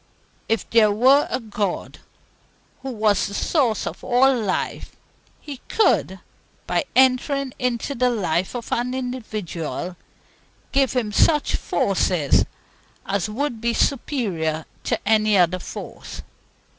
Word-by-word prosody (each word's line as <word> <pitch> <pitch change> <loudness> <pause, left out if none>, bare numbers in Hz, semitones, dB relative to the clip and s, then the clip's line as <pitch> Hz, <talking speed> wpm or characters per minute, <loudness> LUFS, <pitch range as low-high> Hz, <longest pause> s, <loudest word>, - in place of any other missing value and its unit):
If 225 0 0
there 220 -2 +5
were 260 +7 +4
a - - -1
God, 210 -5 -4 0.8
who 270 - -5
was 215 -4 +1
the 200 - -7
Source 245 - +1
of 175 - -6
all 260 +2 +4
life, 210 -6 -3 0.4
He 290 -3 -8
could, 190 - +2 0.5
by 310 - 0
entering 260 +1 +3
into 250 +2 -1
the 250 -1 +2
life 185 -4 -1
of 235 -1 -6
any 250 +2 -1
individual, 215 -9 -4 0.8
give 275 -1 +2
him 235 -5 -1
such 300 +7 +3
forces - - +1 0.6
as 200 +1 -1
would 240 0 -3
be 235 0 0
superior 185 - -1 0.2
to - - 0
any 215 -1 +4
other 180 0 +3
force. - - -8
230 Hz, 120 wpm, -22 LUFS, 205-260 Hz, 0.8 s, there